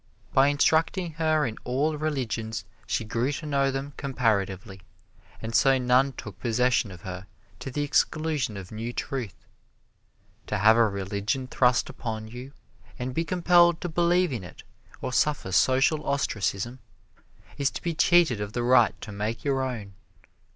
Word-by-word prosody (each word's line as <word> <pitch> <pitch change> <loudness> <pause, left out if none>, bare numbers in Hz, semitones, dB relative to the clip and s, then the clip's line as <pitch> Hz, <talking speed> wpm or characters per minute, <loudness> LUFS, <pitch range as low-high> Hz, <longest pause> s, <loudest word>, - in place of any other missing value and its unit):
By 135 +1 +5
instructing 160 +5 +2
her 155 -1 +2
in 110 -3 -5
all 140 +5 0
religions 120 -8 -3 0.2
she 95 +4 -1
grew 115 +5 -1
to 155 - -6
know 140 -2 +1
them 135 +1 -4
comparatively, 100 -7 -1 0.6
and 115 +1 -6
so 135 +4 +4
none 130 +2 +3
took 105 -4 -9
possession 120 -2 +1
of 90 -3 -11
her 95 0 -7 0.3
to - - -6
the 145 +3 -2
exclusion 150 -5 0
of 95 -2 -9
new 115 +3 -5
truth. 120 -8 -4 1.1
To 105 - -1
have 110 +3 +6
a 115 -1 +4
religion 100 +6 -2
thrust 125 -1 +2
upon 110 -2 -5
you, 125 +4 -9 0.5
and 125 +1 -4
be 165 - 0
compelled 175 -1 +4
to 175 - -3
believe 175 -1 +2
in 115 -6 -4
it 85 - -12 0.4
or 125 - -3
suffer 130 -6 +1
social 135 - +3
ostracism, 120 -3 -2 0.8
is 140 -1 +2
to - - -7
be 170 - -1
cheated 170 - +3
of 105 0 -5
the 120 - -1
right 120 -2 +4
to 110 - -7
make 105 +3 -3
your 135 -2 0
own. 115 -7 -4
125 Hz, 160 wpm, -26 LUFS, 110-145 Hz, 1.1 s, have